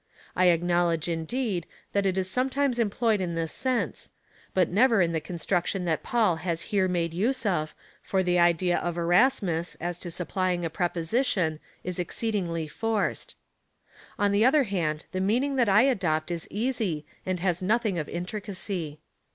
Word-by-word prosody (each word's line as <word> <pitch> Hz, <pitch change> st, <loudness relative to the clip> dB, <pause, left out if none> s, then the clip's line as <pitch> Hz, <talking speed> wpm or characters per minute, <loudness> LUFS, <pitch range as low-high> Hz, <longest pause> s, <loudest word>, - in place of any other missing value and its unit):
I 185 Hz, -, +3 dB
acknowledge, 175 Hz, -1 st, +2 dB
indeed, 175 Hz, +3 st, -2 dB, 0.3 s
that 200 Hz, -1 st, +2 dB
it 190 Hz, 0 st, 0 dB
is 185 Hz, -1 st, 0 dB
sometimes 255 Hz, +4 st, 0 dB
employed 220 Hz, -1 st, +1 dB
in 170 Hz, -2 st, -2 dB
this 165 Hz, -1 st, -2 dB
sense, 255 Hz, -2 st, -2 dB, 0.4 s
but 185 Hz, -3 st, +3 dB
never 225 Hz, +3 st, +4 dB
in 170 Hz, -2 st, +3 dB
the 160 Hz, -1 st, -1 dB
construction 180 Hz, +2 st, -1 dB
that 160 Hz, -2 st, 0 dB
Paul 215 Hz, -8 st, +2 dB
has 170 Hz, -1 st, -2 dB
here 190 Hz, -2 st, +3 dB
made 170 Hz, -2 st, -1 dB
use 235 Hz, +8 st, 0 dB
of, 155 Hz, -6 st, 0 dB, 0.3 s
for 190 Hz, -1 st, 0 dB
the 180 Hz, -1 st, +2 dB
idea 175 Hz, +1 st, +3 dB
of 175 Hz, -1 st, -3 dB
Erasmus, 175 Hz, -1 st, +2 dB
as 175 Hz, 0 st, -3 dB
to 175 Hz, -, -6 dB
supplying 180 Hz, 0 st, -1 dB
a 165 Hz, -, -3 dB
preposition,^ 175 Hz, -, 0 dB, 0.2 s
is 180 Hz, 0 st, -4 dB
exceedingly 175 Hz, -3 st, -2 dB
forced. 220 Hz, +6 st, -2 dB, 0.8 s
On 205 Hz, 0 st, +2 dB
the 200 Hz, +2 st, +3 dB
other 275 Hz, +4 st, +5 dB
hand, 165 Hz, -8 st, -2 dB
the 185 Hz, -, -2 dB
meaning 250 Hz, +8 st, +1 dB
that 240 Hz, -5 st, +3 dB
I 205 Hz, +4 st, +6 dB
adopt 175 Hz, -, +1 dB
is 170 Hz, -1 st, -4 dB
easy, 215 Hz, -, -1 dB, 0.2 s
and 185 Hz, -1 st, -2 dB
has 175 Hz, -1 st, 0 dB
nothing 210 Hz, -1 st, +1 dB
of 150 Hz, -, -4 dB
intricacy. 180 Hz, -4 st, -4 dB
185 Hz, 160 wpm, -27 LUFS, 170-215 Hz, 0.8 s, I